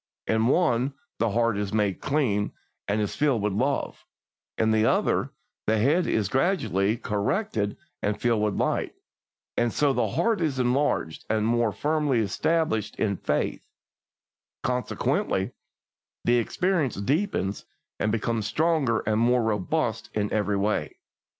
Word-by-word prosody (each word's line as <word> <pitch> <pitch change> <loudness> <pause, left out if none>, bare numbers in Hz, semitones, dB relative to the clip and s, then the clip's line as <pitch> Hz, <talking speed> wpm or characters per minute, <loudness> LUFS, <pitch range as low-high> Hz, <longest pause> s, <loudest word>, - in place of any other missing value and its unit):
In 110 +1 +2
one, 135 -3 +2 0.2
the 115 - +2
heart 115 -1 +1
is 105 -1 -2
made 105 -3 0
clean, 120 -9 0 0.3
and 105 +2 +1
is 105 -2 -1
filled 135 -8 +1
with 105 -1 0
love; 135 +7 -1 0.5
in 110 0 +2
the 110 0 +3
other, - - +2 0.4
the 110 +1 +3
head 150 +11 +2
is 105 -3 +1
gradually 110 - +1
corrected 105 - -1 0.2
and 105 0 -1
filled 115 -2 +2
with 105 -1 0
light, - - -1 0.6
and 120 -1 +1
so 145 +2 +2
the 120 -3 +1
heart 215 - +1
is 150 -5 0
enlarged 125 - 0
and 110 -1 +1
more 115 -1 +2
firmly 150 - 0
established 110 - 0
in 100 -3 0
faith; - - -1 1.0
consequently, 125 0 0 0.7
the 120 +1 +4
experience 160 - 0
deepens 115 - -1 0.3
and 105 - +1
becomes 110 -1 -1
stronger 155 -6 +1
and 110 0 +1
more 120 +1 +3
robust 105 -4 -1
in 105 -1 -1
every 105 -1 +1
way. 100 -7 -1
115 Hz, 135 wpm, -26 LUFS, 105-140 Hz, 1.0 s, the